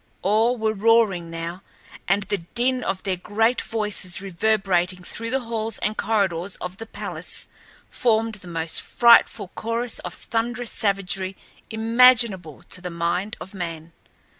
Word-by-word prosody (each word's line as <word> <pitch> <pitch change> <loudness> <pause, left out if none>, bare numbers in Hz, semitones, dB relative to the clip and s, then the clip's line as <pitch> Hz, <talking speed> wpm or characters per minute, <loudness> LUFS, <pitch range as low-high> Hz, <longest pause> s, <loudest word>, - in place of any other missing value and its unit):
All 220 +5 +3
were 220 -1 0
roaring 210 -5 +3
now, 165 +2 -5 0.5
and 195 +2 +2
the 205 0 -2
din 245 +9 0
of 190 -1 -2
their 190 -2 -1
great 225 +6 +1
voices 210 -5 -1
reverberating 190 -2 0
through 230 +5 -5
the 265 +2 0
halls 225 -2 -3
and 215 - -1
corridors 195 -4 0
of 180 +1 -7
the 225 - -8
palace - - -5 0.4
formed 225 -1 +1
the 180 - -11
most 165 -1 -1
frightful 235 -4 +4
chorus 230 +4 -2
of - - -6
thunderous 240 +1 -2
savagery 195 -2 -1 0.3
imaginable 225 - +4
to 185 - -6
the 180 - -5
mind 170 +5 -2
of 190 - -9
man. 165 -3 -6
205 Hz, 140 wpm, -23 LUFS, 180-225 Hz, 0.5 s, frightful